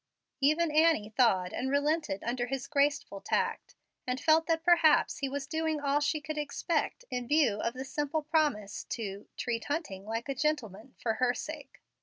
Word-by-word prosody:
Even 310 +4 +3
Annie 310 -9 +3
thawed 190 -8 +3
and 260 - -2
relented 285 -7 0
under 245 +1 -1
his 270 0 -3
graceful 285 -7 0
tact, - - -1 0.3
and 250 +1 -1
felt 320 +3 +4
that 325 -1 +1
perhaps 335 -4 +4
he 275 -2 -1
was 280 0 -3
doing 315 +1 -1
all 285 0 +1
she 295 +1 0
could 305 0 -5
expect 305 +10 -2
in 245 -1 -3
view 290 -8 +3
of 230 +2 -2
the 260 +1 -5
simple 295 +3 -2
promise 295 - 0
to 205 -4 -5
"treat 235 -2 -2
Hunting 250 - -4
like 225 +3 -3
a 275 - -1
gentleman, 255 -6 -2
for 225 - -1
her 250 -1 +3
sake." 305 -2 -8
285 Hz, 175 wpm, -30 LUFS, 240-310 Hz, 0.3 s, felt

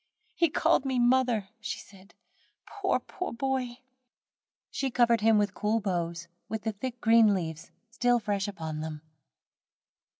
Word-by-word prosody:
"He 335 -2 +2
called 285 - +2
me 265 -2 -1
mother," 240 -4 +2
she 235 +2 -4
said, 195 0 -16 0.5
"poor 400 -2 0
boy, - - -13
poor 365 - -4
boy." 255 0 -2 0.9
She 270 - -1
covered 235 -2 +3
him 225 +1 +5
over 210 - +4
with 205 -1 -1
cool 215 +3 0
boughs, 170 -4 -2 0.2
with 220 -1 -4
the 220 - 0
thick 245 +4 -6
green 225 -2 +6
leaves 160 -4 -5 0.2
still 245 +1 +2
fresh 205 -2 -1
upon 160 -6 -5
them. 155 -1 -6
220 Hz, 155 wpm, -29 LUFS, 195-245 Hz, 0.9 s, green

